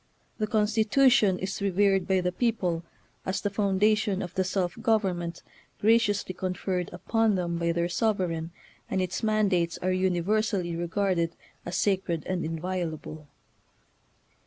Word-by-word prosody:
The 215 Hz, -, 0 dB
Constitution 220 Hz, 0 st, +3 dB
is 190 Hz, +2 st, -4 dB
revered 195 Hz, -1 st, +2 dB
by 190 Hz, -1 st, +2 dB
the 180 Hz, 0 st, 0 dB
people 180 Hz, -6 st, 0 dB, 0.4 s
as 190 Hz, +1 st, -2 dB
the 205 Hz, 0 st, -2 dB
foundation 200 Hz, 0 st, +2 dB
of 180 Hz, -1 st, -7 dB
the 190 Hz, -, +1 dB
self 185 Hz, -1 st, -1 dB
government 185 Hz, -7 st, 0 dB, 0.4 s
graciously 210 Hz, -3 st, +2 dB
conferred 185 Hz, 0 st, -2 dB
upon 220 Hz, +4 st, +1 dB
them 170 Hz, -2 st, -2 dB
by 170 Hz, 0 st, +1 dB
their 170 Hz, 0 st, 0 dB
sovereign, 180 Hz, -5 st, -1 dB, 0.4 s
and 190 Hz, -, 0 dB
its 180 Hz, -1 st, -2 dB
mandates 200 Hz, -6 st, +1 dB
are 185 Hz, -, +1 dB
univer 185 Hz, +3 st, +1 dB
sally 180 Hz, -6 st, -2 dB
regarded 170 Hz, 0 st, 0 dB, 0.3 s
as 175 Hz, -, -2 dB
sacred 190 Hz, -5 st, 0 dB
and 185 Hz, -2 st, -2 dB
inviolable. 160 Hz, -2 st, -4 dB
185 Hz, 135 wpm, -27 LUFS, 175-210 Hz, 0.4 s, Constitution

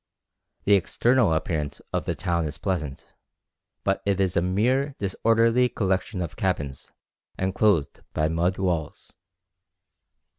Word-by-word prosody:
The 100 Hz, -, +4 dB
external 115 Hz, +3 st, +3 dB
appearance 80 Hz, -3 st, -1 dB
of -, -, -1 dB
the -, -, -1 dB
town 85 Hz, -3 st, -1 dB
is 75 Hz, -1 st, -5 dB
pleasant, 75 Hz, -5 st, -4 dB, 0.7 s
but 95 Hz, 0 st, 0 dB
it 100 Hz, -1 st, 0 dB
is 95 Hz, -2 st, +1 dB
a -, -, +3 dB
mere 125 Hz, +10 st, +1 dB
disorderly 115 Hz, +5 st, +2 dB
collection 95 Hz, -2 st, -1 dB
of 85 Hz, -, -6 dB
cabins 75 Hz, -8 st, -2 dB, 0.5 s
enclosed 95 Hz, -4 st, +1 dB
by 75 Hz, -, +1 dB
mud 85 Hz, +3 st, 0 dB
walls. 85 Hz, -5 st, -2 dB
95 Hz, 120 wpm, -25 LUFS, 80-105 Hz, 0.7 s, The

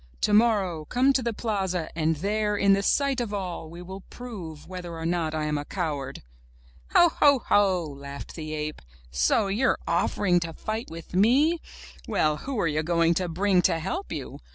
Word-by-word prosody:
''Tomorrow 205 Hz, -7 st, +2 dB
come 260 Hz, +3 st, +3 dB
to 265 Hz, -, +2 dB
the 235 Hz, -1 st, -1 dB
plaza 195 Hz, -6 st, -2 dB
and 160 Hz, 0 st, +1 dB
there, 210 Hz, +5 st, 0 dB
in 200 Hz, -1 st, +4 dB
the 195 Hz, -, +2 dB
sight 275 Hz, +4 st, +1 dB
of 210 Hz, -3 st, -3 dB
all, 180 Hz, -4 st, -4 dB
we 170 Hz, +2 st, -9 dB
will 190 Hz, +2 st, -8 dB
prove 185 Hz, -12 st, -8 dB
whether 180 Hz, -2 st, -7 dB
or 165 Hz, -, -5 dB
not 165 Hz, -2 st, 0 dB
I 155 Hz, -, -1 dB
am 150 Hz, -1 st, -1 dB
a -, -, -4 dB
coward!" 145 Hz, -6 st, -4 dB, 0.7 s
'*Ho, 345 Hz, -, +7 dB
ho, 285 Hz, -2 st, +6 dB
ho!" 190 Hz, -4 st, +3 dB
laughed 140 Hz, -1 st, -8 dB
the 155 Hz, -2 st, -6 dB
ape, 150 Hz, 0 st, -4 dB, 0.3 s
*'so 65 Hz, -, +2 dB
you're 205 Hz, +7 st, +1 dB
offering 180 Hz, -3 st, +2 dB
to 165 Hz, -1 st, -5 dB
fight 220 Hz, +6 st, -4 dB
with 165 Hz, +1 st, -10 dB
me? 265 Hz, -, +4 dB, 0.5 s
Well, 155 Hz, -1 st, +1 dB
who 265 Hz, -, -4 dB
are 170 Hz, -, +2 dB
you 150 Hz, 0 st, 0 dB
going 170 Hz, +1 st, +2 dB
to 180 Hz, +1 st, -1 dB
bring 185 Hz, +2 st, +2 dB
to 170 Hz, -1 st, +2 dB
help 330 Hz, -, -4 dB
you? -, -, -6 dB
180 Hz, 185 wpm, -26 LUFS, 160-215 Hz, 0.7 s, Ho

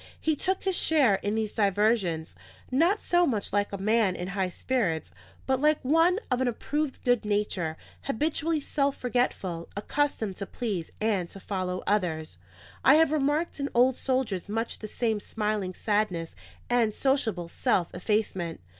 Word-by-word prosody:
He 315 Hz, -1 st, +1 dB
took 380 Hz, +6 st, -1 dB
his 380 Hz, -2 st, +1 dB
share 290 Hz, -12 st, +4 dB
in 205 Hz, +1 st, -1 dB
these 220 Hz, -1 st, -2 dB
diversions, 200 Hz, -5 st, +1 dB, 0.4 s
not 335 Hz, +11 st, +2 dB
so 350 Hz, 0 st, +3 dB
much 215 Hz, -7 st, -1 dB
like 205 Hz, 0 st, +1 dB
a 200 Hz, -, -3 dB
man 210 Hz, -1 st, +2 dB
in 180 Hz, +1 st, -4 dB
high 195 Hz, -1 st, -1 dB
spirits, 180 Hz, -6 st, -1 dB, 0.3 s
but 265 Hz, 0 st, +1 dB
like 300 Hz, 0 st, +4 dB
one 330 Hz, +6 st, +4 dB
of 250 Hz, 0 st, +1 dB
an 260 Hz, -, +2 dB
approved 290 Hz, +4 st, -2 dB
good 245 Hz, -2 st, +2 dB
nature, 205 Hz, -6 st, -1 dB, 0.3 s
habitually 315 Hz, +4 st, 0 dB
self 280 Hz, -1 st, -1 dB
forgetful, 200 Hz, -9 st, -1 dB
accustomed 220 Hz, -3 st, -1 dB
to 200 Hz, -, -5 dB
please 200 Hz, -9 st, -4 dB
and 205 Hz, -5 st, 0 dB
to 195 Hz, -, -10 dB
follow 185 Hz, -2 st, -3 dB
others. 160 Hz, -, -1 dB, 0.4 s
I 270 Hz, -, +7 dB
have 320 Hz, -1 st, +4 dB
remarked 300 Hz, +2 st, 0 dB
in 280 Hz, 0 st, -1 dB
old 250 Hz, +1 st, +5 dB
soldiers 255 Hz, -9 st, -1 dB
much 225 Hz, +2 st, -2 dB
the 215 Hz, -, -6 dB
same 220 Hz, 0 st, -1 dB
smiling 210 Hz, -3 st, -2 dB
sadness 205 Hz, -6 st, -1 dB, 0.3 s
and 235 Hz, -3 st, +2 dB
sociable 225 Hz, -10 st, 0 dB
self 180 Hz, -1 st, 0 dB
effacement. 185 Hz, -3 st, -1 dB
220 Hz, 155 wpm, -28 LUFS, 190-270 Hz, 0.4 s, I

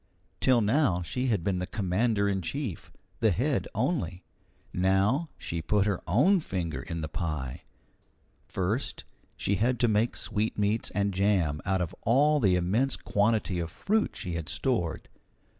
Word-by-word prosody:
Till 125 Hz, -3 st, +4 dB
now 105 Hz, -, +2 dB
she 125 Hz, +10 st, -2 dB
had 105 Hz, -8 st, +1 dB
been 95 Hz, -1 st, 0 dB
the 90 Hz, -, -3 dB
commander 100 Hz, +2 st, +1 dB
in 95 Hz, -1 st, 0 dB
chief 95 Hz, -, -4 dB, 0.3 s
the 110 Hz, -, +4 dB
head 125 Hz, -, 0 dB
only; 110 Hz, -, -1 dB, 0.5 s
now 95 Hz, -, +2 dB
she 85 Hz, 0 st, -4 dB
put 100 Hz, +4 st, +2 dB
her 100 Hz, -4 st, 0 dB
own 150 Hz, -, +4 dB
finger 90 Hz, -, -3 dB
in 85 Hz, -1 st, -5 dB
the 80 Hz, -, -3 dB
pie. 75 Hz, -5 st, -4 dB, 0.8 s
First, 100 Hz, +8 st, -2 dB, 0.3 s
she 100 Hz, -, 0 dB
had 120 Hz, +3 st, +1 dB
to 120 Hz, -, +5 dB
make 110 Hz, +2 st, +1 dB
sweetmeats 105 Hz, 0 st, -1 dB
and 100 Hz, -1 st, +1 dB
jam 90 Hz, -6 st, +1 dB
out 95 Hz, -1 st, +1 dB
of 80 Hz, -, -5 dB
all 145 Hz, +6 st, +4 dB
the 95 Hz, -8 st, +3 dB
immense 105 Hz, +10 st, +1 dB
quantity 105 Hz, -3 st, +1 dB
of 85 Hz, -1 st, -3 dB
fruit 215 Hz, -, 0 dB
she 90 Hz, -4 st, -4 dB
had 85 Hz, -1 st, -4 dB
stored. 100 Hz, -, -1 dB
100 Hz, 155 wpm, -28 LUFS, 90-120 Hz, 0.8 s, to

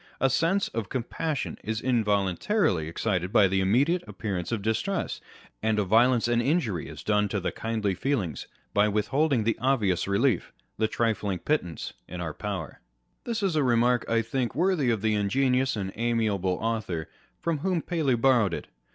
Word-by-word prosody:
A 135 Hz, -, +3 dB
sense 170 Hz, +9 st, +2 dB
of 110 Hz, -4 st, -4 dB
compassion 135 Hz, +4 st, -3 dB
is 110 Hz, 0 st, -2 dB
involuntarily 105 Hz, -, +1 dB
excited 90 Hz, +1 st, -1 dB
by 100 Hz, -, +5 dB
the 95 Hz, +1 st, +1 dB
immediate 140 Hz, -, +2 dB
appearance 95 Hz, -4 st, -4 dB
of 110 Hz, -4 st, -2 dB
distress, 145 Hz, -, -1 dB, 0.4 s
and 110 Hz, 0 st, +1 dB
a 105 Hz, -, +2 dB
violence 115 Hz, +5 st, +4 dB
and 120 Hz, 0 st, +2 dB
injury 120 Hz, -, 0 dB
is -, -, -9 dB
done 105 Hz, -1 st, +2 dB
to 105 Hz, -, -1 dB
the 95 Hz, -, -2 dB
kindly 110 Hz, -3 st, -1 dB
feelings 95 Hz, -, -2 dB, 0.3 s
by 105 Hz, +1 st, +4 dB
with 105 Hz, 0 st, 0 dB
holding 140 Hz, -4 st, +2 dB
the 115 Hz, +2 st, 0 dB
obvious 110 Hz, -10 st, +1 dB
relief, 110 Hz, +6 st, +1 dB, 0.3 s
the 110 Hz, -, +3 dB
trifling 105 Hz, -4 st, -1 dB
pittance 90 Hz, -, -2 dB
in 90 Hz, -, -7 dB
our 80 Hz, -3 st, -3 dB
power, 95 Hz, -5 st, -5 dB, 0.4 s
This 230 Hz, -3 st, -2 dB
is 190 Hz, -5 st, +1 dB
a 155 Hz, -, +3 dB
remark, 120 Hz, -1 st, +3 dB
I 115 Hz, 0 st, +2 dB
think, 120 Hz, +1 st, -2 dB
worthy 170 Hz, -5 st, +2 dB
of 110 Hz, -3 st, 0 dB
the 110 Hz, -1 st, +2 dB
ingenious 130 Hz, +5 st, +1 dB
and 95 Hz, -3 st, -3 dB
amiable 110 Hz, -6 st, 0 dB
author 110 Hz, -8 st, -2 dB, 0.3 s
from 165 Hz, -3 st, -1 dB
whom 175 Hz, +1 st, 0 dB
Paley 155 Hz, -8 st, +1 dB
borrowed 115 Hz, -7 st, +3 dB
it. -, -, -7 dB
115 Hz, 170 wpm, -27 LUFS, 100-135 Hz, 0.4 s, by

